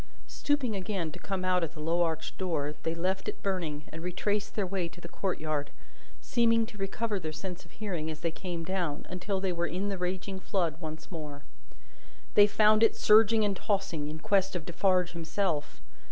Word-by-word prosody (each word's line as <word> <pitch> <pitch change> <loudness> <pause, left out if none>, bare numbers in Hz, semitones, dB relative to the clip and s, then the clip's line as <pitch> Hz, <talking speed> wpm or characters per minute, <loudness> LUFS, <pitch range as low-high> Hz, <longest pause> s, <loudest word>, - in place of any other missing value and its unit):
Stooping 280 -7 0
again 185 -4 -2
to - - -10
come 190 -2 -3
out 180 -1 +3
at 160 - -2
the 155 - -11
low 165 +3 +1
arched 160 -2 -1
door, 155 -6 -1
they 165 0 -1
left 185 +3 -1
it - - -7
burning, 170 -7 -1
and 160 - -7
retraced 205 +4 -1
their 205 - +1
way 185 -2 -1
to 175 - -14
the 170 - -8
courtyard; 155 -6 -2 0.5
seeming 230 -2 +3
to 220 -2 -12
recover 205 +2 -1
their 155 -3 -4
sense 180 +3 -6
of 170 - -19
hearing 180 -7 -3
as 155 -1 -6
they 165 - 0
came 170 -1 -4
down, 175 -4 -2
until 190 +2 -1
they 190 -1 0
were 170 0 0
in 190 +5 -2
the 195 -2 -3
raging 185 +2 -2
flood 175 -5 0
once 155 +1 -7
more. 150 -4 -6 0.9
They 205 0 +8
found 215 +1 +5
it 225 - +6
surging 220 0 +6
and 200 -1 +1
tossing, 190 -7 -1
in 155 +1 -5
quest 195 +2 +2
of 170 -3 -3
Defarge 180 0 +2
himself. 170 -2 -2
180 Hz, 195 wpm, -30 LUFS, 165-200 Hz, 0.9 s, They